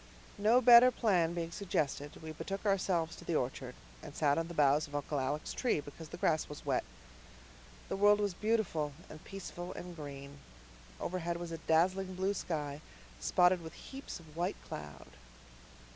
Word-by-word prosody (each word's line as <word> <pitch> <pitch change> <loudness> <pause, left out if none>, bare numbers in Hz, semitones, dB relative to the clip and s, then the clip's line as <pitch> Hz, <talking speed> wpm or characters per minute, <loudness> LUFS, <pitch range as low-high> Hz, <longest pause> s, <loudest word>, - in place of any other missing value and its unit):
No 225 +5 +5
better 245 +1 +9
plan 180 -9 +2
being 170 -1 -3
suggested, 150 -6 -2
we 160 - -5
betook 195 +6 -5
ourselves 185 -5 +1
to - - -11
the 170 - -1
orchard, 125 -1 -2 0.3
and 145 - -10
sat 145 0 +3
on 165 - -2
the 170 - -8
boughs 150 +1 +4
of 145 - -9
Uncle 145 0 -1
Alec's 145 +4 -2
tree 245 - +1
because 150 +2 -9
the 175 - -7
grass 160 -3 +1
was 150 - -9
wet. - - +1 1.0
The - - -2
world 205 +1 +5
was 205 -2 0
beautiful 185 -8 0 0.2
and 155 - -11
peaceful 180 -2 -7
and 180 -1 -8
green. 140 -2 -8 0.6
Overhead 170 -1 -2
was 170 -1 -6
a 165 - -5
dazzling 185 +3 +2
blue 190 +2 0
sky, 150 -6 -3 0.4
spotted 180 -1 +4
with 160 -1 -8
heaps 270 -7 -8
of 160 -2 -16
white 175 +4 -1
cloud. 75 -2 -8
170 Hz, 170 wpm, -33 LUFS, 150-190 Hz, 1.0 s, better